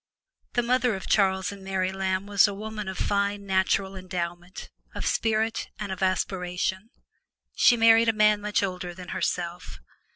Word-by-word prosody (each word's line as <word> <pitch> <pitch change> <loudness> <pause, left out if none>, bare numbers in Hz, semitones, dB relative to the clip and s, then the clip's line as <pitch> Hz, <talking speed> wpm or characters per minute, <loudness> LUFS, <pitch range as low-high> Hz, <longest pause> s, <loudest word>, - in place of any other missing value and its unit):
The 240 - +1
mother 250 -1 +2
of 190 - -7
Charles 190 -2 +2
and 200 -1 -11
Mary 190 -1 -1
Lamb 190 0 -2
was 205 0 +4
a 200 - -4
woman 215 0 -6
of 190 -1 -5
fine 200 0 -1
natural 190 0 +1
endowment, 180 -1 -6 0.2
of - - -4
spirit 225 0 0
and 210 -2 -5
of 190 - -6
aspiration. 185 +1 -1 0.6
She 240 - +5
married 225 0 +6
a - - +2
man 210 -1 +3
much 210 0 0
older 180 -2 -4
than 180 0 -10
herself. 175 -1 -3
195 Hz, 160 wpm, -26 LUFS, 185-210 Hz, 0.6 s, married